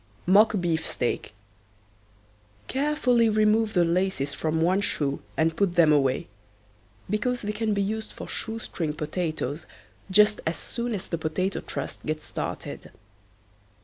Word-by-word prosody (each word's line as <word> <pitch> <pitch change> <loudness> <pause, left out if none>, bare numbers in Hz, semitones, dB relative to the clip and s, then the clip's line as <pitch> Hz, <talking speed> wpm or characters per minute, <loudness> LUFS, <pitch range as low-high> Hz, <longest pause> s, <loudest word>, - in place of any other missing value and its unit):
MOCK 205 +5 +6
BEEFSTEAK. 160 -7 -1 1.4
Carefully 255 -5 +2
remove 215 +1 +3
the 175 -1 +5
laces 170 -5 0
from 160 0 -1
one 180 +4 +3
shoe 140 -7 -1 0.2
and 160 0 +2
put 195 -2 +1
them 160 -3 +6
away, 135 -3 +2 0.8
because 240 +5 -1
they 210 - -1
can 215 0 -1
be 200 - +1
used 220 +2 -3
for - - -8
shoe 225 0 -3
string 165 -8 -3
potatoes 155 -1 -3 0.4
just 210 +2 +5
as 165 - -1
soon 235 -1 -3
as 190 - -4
the 170 - -3
Potato 185 +5 -1
Trust 140 - -6
gets 155 0 -3
started. - - -5
185 Hz, 135 wpm, -26 LUFS, 160-215 Hz, 1.4 s, MOCK